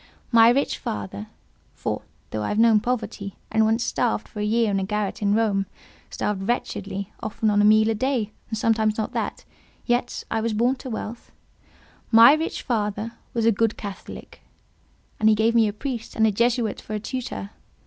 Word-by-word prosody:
My 230 -1 +7
rich 270 +4 +1
father 100 0 -5 0.5
(for, - - -3 0.3
though 110 - -2
I 105 - -2
have 210 - -2
known 225 -1 +6
poverty, 215 -4 -3 0.2
and 220 0 +3
once 225 +2 +2
starved 230 -3 -1
for 210 - -9
a - - -1
year 220 0 +2
in 195 - +1
a - - -1
garret 210 +1 -2
in 205 0 +2
Rome—starved 200 -1 -3
wretchedly, 200 -4 -3
often 215 0 -1
on 205 0 +3
a - - +4
meal 215 +1 +6
a 225 - +2
day, 230 -2 -1 0.2
and 220 - -3
sometimes 220 -1 +1
not 220 - -2
that—yet 245 0 -4
I 225 - 0
was 225 0 -1
born 240 +5 +2
to 260 - -8
wealth)—my 230 +1 +1
rich 315 +2 -2
father 215 -2 -2 0.2
was 230 -1 +1
a 230 - +6
good 225 +1 0
Catholic; 200 -2 -9 0.8
and 220 - +5
he 215 - +5
gave 220 +2 +2
me 230 -2 +4
a - - -1
priest 235 +1 -5
and 220 - +3
a 220 - +4
Jesuit 235 +1 0
for 215 - -5
a - - -2
tutor. 210 - -5
220 Hz, 180 wpm, -24 LUFS, 205-230 Hz, 0.8 s, My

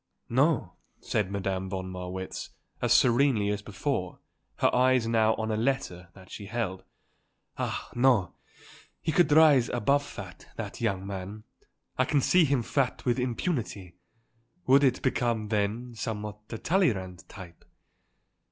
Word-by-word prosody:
"No," - - +1 0.2
said 105 -3 -1
Madame 95 -1 -2
von 95 -1 -4
Marwitz, 90 +1 -6 0.3
as 120 - 0
serenely 120 -3 +4
as 105 0 -2
before, 100 -1 -3 0.4
her - - +2
eyes 130 -1 +3
now 110 -1 +3
on 110 0 -3
a - - 0
letter 110 -7 -2
that 95 -2 -15
she 100 - -8
held. 110 -5 -3 0.8
"Ah, - - -3
no; 120 -6 +3 0.7
he 160 - -2
could 160 -1 +3
rise 145 -6 +6
above 140 +5 +1
fat, 95 -10 -10
that - - -6
young 100 -4 -1
man. 100 +2 -6 0.6
I 130 - +4
can 145 +2 +2
see 175 +5 +4
him 135 -4 +1
fat 130 +1 -1
with 125 0 +1
impunity. 120 - -3 0.7
Would 135 +2 +5
it 130 -2 +2
become, 120 -5 0
then, 110 +3 -1
somewhat 105 -2 -5
the 115 - -6
Talleyrand 100 - 0
type? 90 -5 -12
110 Hz, 140 wpm, -28 LUFS, 95-130 Hz, 0.8 s, rise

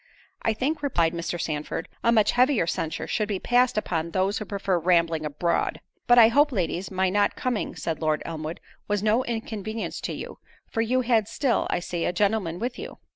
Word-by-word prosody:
"I 225 - +1
think," 290 +8 -1
replied 170 - +1
Mr. 170 +1 -3
Sandford, 155 +1 -3 0.2
"a 235 - +4
much 215 -3 +4
heavier 250 - +3
censure 165 -1 -2
should 215 -2 -1
be 205 -2 -1
passed 245 +4 +2
upon 170 -5 -1
those 190 +4 0
who 215 - -5
prefer 195 -3 -1
rambling 165 -2 +2
abroad." 170 +4 -1 0.3
"But 245 - +6
I 225 -2 +9
hope, 290 +5 +4
ladies, 185 -3 -2
my 190 -1 0
not 205 +1 +2
coming," 245 -4 -2
said 165 -2 -3
Lord 155 -1 0
Elmwood, 160 0 -5 0.3
"was 205 -1 0
no 220 +4 +3
inconvenience 220 -2 -4
to - - -3
you; - - -7 0.3
for 225 - -2
you 250 +3 +1
had 230 -4 +2
still, 265 0 0
I 175 - 0
see, 175 -1 -3
a - - 0
gentleman 195 -3 0
with 245 +5 -4
you." - - -7
205 Hz, 195 wpm, -25 LUFS, 170-230 Hz, 0.3 s, I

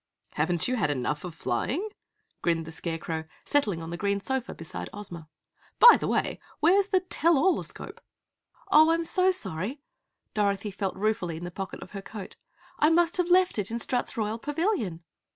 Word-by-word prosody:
"Haven't 165 +2 0
you 255 0 0
had 195 -9 +1
enough 145 +1 -1
flying?" 240 - -2 0.5
grinned 165 -1 +1
the 160 - -8
Scarecrow, 165 -1 -4 0.2
settling 205 - +1
on 165 - -7
the 170 - -4
green 200 +1 0
sofa 265 +4 -3
beside 165 - -7
Ozma. 175 -6 -8 0.5
"By 480 - +10
the - - -3
way, - - 0 0.2
where's 380 +5 +4
the 375 -2 +2
tell 340 -3 +2
all 360 +7 +3
escope?" - - -9 0.7
"Oh, 310 +1 +7
I'm 335 +1 +2
so 365 +3 +2
sorry," 255 - -2 0.5
Dorothy 200 -1 0
felt 195 -1 -3
ruefully 190 -5 -1
in 170 - -8
the 175 - -5
pocket 190 +2 -6
of - - -14
her 195 - -6
coat. 205 -1 -9 0.4
"I 300 - +5
must 340 +1 +3
have 360 -1 +1
left 365 - +4
it 200 - -2
in 230 - -2
Strut's 245 +1 -2
Royal 220 +1 -1
Pavilion!" 295 - -1
210 Hz, 175 wpm, -27 LUFS, -, 0.7 s, By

